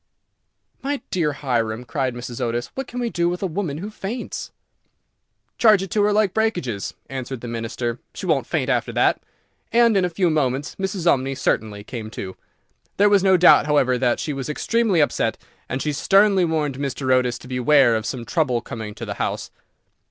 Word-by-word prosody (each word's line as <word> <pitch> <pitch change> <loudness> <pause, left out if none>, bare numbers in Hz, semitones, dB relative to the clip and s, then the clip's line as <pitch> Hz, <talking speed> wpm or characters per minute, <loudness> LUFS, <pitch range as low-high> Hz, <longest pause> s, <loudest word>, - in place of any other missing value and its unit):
"My 280 +1 -2
dear 165 -5 +1
Hiram," 120 -5 -2
cried 130 -2 -2
Mrs. 120 +1 -6
Otis, 120 0 -2
"what 270 -1 -5
can 250 - -6
we 240 -2 -1
do 170 0 +1
with 180 +2 -4
a - - +2
woman 170 -4 -3
who 200 +6 -6
faints?" 215 +4 -5 1.1
"Charge 215 -4 +5
it 195 - -7
to 210 - +2
her 205 +1 +3
like 205 -2 +2
breakages," 175 - -1
answered 130 -2 -5
the 120 - -6
Minister; 115 +1 -3 0.2
"she - - -6
won't - - +1
faint - - -1
after - - 0
that;" - - +2 0.5
and 235 -1 +4
in 195 - +3
a 180 - +1
few 175 0 +1
moments 140 -1 -1
Mrs. 190 -2 -3
Umney 135 -5 +2
certainly 105 -2 -1
came 110 -1 -7
to. 95 -3 -7 0.6
There 205 +1 +5
was 200 -1 +5
no 190 -1 +5
doubt, 175 -4 +6
however, 135 -4 +3
that 125 -1 +1
she 150 - -2
was 135 +1 -5
extremely 210 +2 +1
upset, 145 - 0 0.3
and 130 - -2
she 150 - -1
sternly 195 +3 +4
warned 150 -5 -1
Mr. 135 -1 0
Otis 125 -2 +2
to - - -13
beware 130 -1 +4
of 110 0 -2
some 125 -3 -4
trouble 135 -7 +1
coming 110 -2 -7
to - - -6
the - - -4
house. - - -3
145 Hz, 190 wpm, -22 LUFS, 125-190 Hz, 1.1 s, doubt